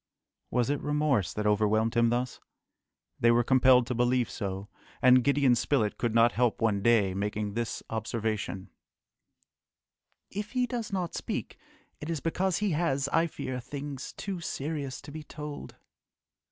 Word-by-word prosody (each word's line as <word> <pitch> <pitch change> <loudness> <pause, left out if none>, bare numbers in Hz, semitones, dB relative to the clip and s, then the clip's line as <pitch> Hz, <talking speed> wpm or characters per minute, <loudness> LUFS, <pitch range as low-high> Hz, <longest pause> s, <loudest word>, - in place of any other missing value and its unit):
Was 125 +2 +1
it 145 - -1
remorse 150 - +1
that 105 - -3
overwhelmed 110 +2 +2
him 115 0 +4
thus? 125 +1 -1 0.8
They 115 - +4
were 120 +1 +4
compelled 130 0 +5
to 125 - -2
believe 125 0 +1
so, 95 0 -4 0.3
and 125 0 +6
Gideon 140 -2 +4
Spilett 120 -3 +1
could 115 -2 -1
not 115 +1 +6
help 120 -1 +1
one 105 -3 +1
day 105 -4 +3
making 105 +1 -2
this 115 +1 -3
observation, 110 -4 -3 1.6
"If 205 +3 -5
he 250 -1 +2
does 240 -4 -4
not 180 -4 -2
speak - - -4 0.4
it 150 - -6
is 165 -2 -1
because 180 +3 0
he 205 -2 0
has, 140 -4 0
I 165 +3 +2
fear, 130 -5 -5
things 140 +1 -6
too 195 -3 -5
serious 145 -4 -4
to - - -11
be 155 +1 -7
told!" 150 -1 -8
125 Hz, 155 wpm, -29 LUFS, 110-150 Hz, 1.6 s, and